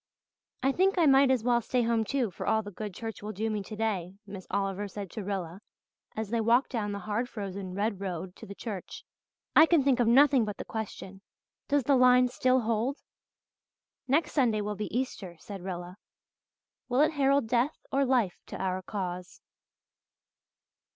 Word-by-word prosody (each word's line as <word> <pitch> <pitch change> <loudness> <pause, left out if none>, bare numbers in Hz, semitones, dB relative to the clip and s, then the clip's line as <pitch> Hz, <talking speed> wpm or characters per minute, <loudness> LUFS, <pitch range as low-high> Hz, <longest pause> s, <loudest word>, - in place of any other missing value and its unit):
"I 270 - +4
think 380 +6 +2
I 340 - +4
might 270 -1 +6
as 255 -4 +2
well 240 0 +3
stay 245 +2 0
home, 230 -1 +1
too, 245 -2 -1
for - - -6
all 220 0 +2
the 205 - -8
good 210 +2 -6
church 225 +4 -7
will 210 +1 -5
do 220 +3 -2
me 210 -1 -2
today," 200 -3 -3
Miss 195 -2 -9
Oliver 200 0 -1
said 200 -2 -7
to 215 - -5
Rilla, 190 -2 -4 0.5
as 220 -1 -4
they 230 -1 +1
walked 235 +4 +3
down 215 -5 -2
the 200 - -3
hard 220 +4 -1
frozen 195 -3 -6
red 205 0 -1
road 185 -2 -5
to - - -11
the 200 - -8
church. 200 -5 -7 0.5
"I 315 - +8
can 325 -5 +4
think 265 -2 +3
of 240 - +3
nothing 265 +1 +6
but 210 -2 -4
the - - -6
question, 195 -3 -6 0.5
'Does 285 -1 +2
the 275 +3 +3
line 250 0 +5
still 255 +1 +2
hold?'" 230 +5 0 1.1
"Next 290 +5 +2
Sunday 240 -7 +2
will 210 0 -2
be 210 +1 -4
Easter," 200 -9 -4
said 195 +3 -9
Rilla. 180 0 -6 0.9
"Will 250 +3 +3
it 310 - +4
herald 280 -4 +2
death 245 +5 +1
or 275 +1 +2
life 245 -8 +1
to - - -7
our 185 -1 -1
cause?" 180 -2 -5
220 Hz, 185 wpm, -29 LUFS, 195-255 Hz, 1.1 s, I